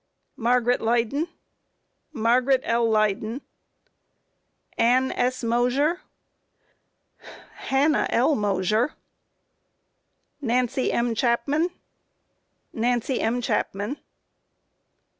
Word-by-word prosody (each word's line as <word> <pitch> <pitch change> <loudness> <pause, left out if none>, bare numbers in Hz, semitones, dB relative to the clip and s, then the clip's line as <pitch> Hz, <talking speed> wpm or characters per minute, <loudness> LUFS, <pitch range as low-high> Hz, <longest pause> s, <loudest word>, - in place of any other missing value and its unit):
Q. - - -15
Margaret 245 0 +2
Leyden? 235 +7 0
A. 310 - -23
Margaret 250 +4 +3
L. 230 0 +1
Leyden. 215 +3 0
Q. - - -41 1.3
Ann 255 +3 +3
S. 255 +1 -1
Mosher? 250 +8 +1 1.2
A. - - -28 0.4
Hannah 285 +3 +2
L. 260 +6 +2
Mosher. 205 +1 +1
Q. - - -22 1.5
Nancy 250 +2 +1
M. 235 0 0
Chapman? 265 +7 +1
A. - - -3 1.1
Nancy 245 +2 0
M. 235 +2 0
Chapman. 210 +2 -2
245 Hz, 90 wpm, -24 LUFS, 230-265 Hz, 1.5 s, Margaret